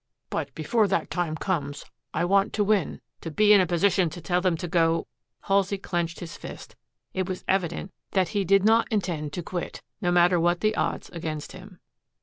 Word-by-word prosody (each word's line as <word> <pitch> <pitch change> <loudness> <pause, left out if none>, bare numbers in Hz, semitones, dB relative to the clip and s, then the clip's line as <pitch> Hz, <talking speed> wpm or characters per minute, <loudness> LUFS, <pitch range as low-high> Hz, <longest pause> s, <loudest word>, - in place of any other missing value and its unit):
But 145 -3 -2
before 210 +8 +2
that 195 - -1
time 175 -3 -1
comes 150 -5 -3 0.3
I - - 0
want 195 +3 +2
to 210 - +2
win, 205 -5 +1 0.2
to 165 - -5
be 210 +7 +5
in 200 - +7
a 180 - +1
position 175 +1 +2
to 175 - -8
tell 180 +2 0
them 180 -3 +1
to 175 - -4
go 165 -1 +2 0.2
" 120 -1 -58
Halsey 195 0 +2
clenched 175 -3 -3
his 170 -2 -7
fist. - - -10 0.4
It 185 0 -2
was 185 - -5
evident 185 0 -1 0.2
that 185 -3 +2
he 200 +2 0
did 195 +2 +4
not 225 +3 +4
intend 170 -8 -1
to 175 - -4
quit, 175 +1 -5 0.2
no 175 -3 +1
matter 175 0 +4
what 175 +1 +2
the 215 0 +2
odds - - -2
against 155 -3 -5
him. 185 0 -12
180 Hz, 200 wpm, -26 LUFS, 165-195 Hz, 0.4 s, in